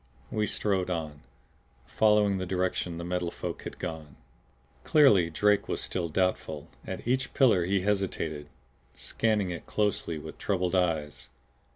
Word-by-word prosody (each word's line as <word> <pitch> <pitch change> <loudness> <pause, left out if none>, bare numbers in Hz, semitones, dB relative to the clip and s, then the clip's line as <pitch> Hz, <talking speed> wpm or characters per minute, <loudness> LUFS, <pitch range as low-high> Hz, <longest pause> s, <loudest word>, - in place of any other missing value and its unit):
We 105 -1 0
strode 95 -3 0
on, 80 -4 -4 0.6
following 105 -2 +3
the 95 - -3
direction 90 -2 -1
the 85 - -5
Metal 90 0 -1
Folk - - -5
had - - -7
gone. 75 -3 -6 0.7
Clearly 105 - +5
Drake 105 +5 +2
was - - -2
still 85 -2 -2
doubtful; 80 -4 -1 0.2
at - - -6
each 130 +2 0
pillar 110 -10 +4
he 95 +1 +1
hesitated, 95 -7 -1 0.5
scanning 100 - 0
it 85 - -7
closely 105 -6 0
with 80 +1 -9
troubled 90 -3 0
eyes. 75 -8 0
90 Hz, 140 wpm, -28 LUFS, 80-105 Hz, 0.7 s, Clearly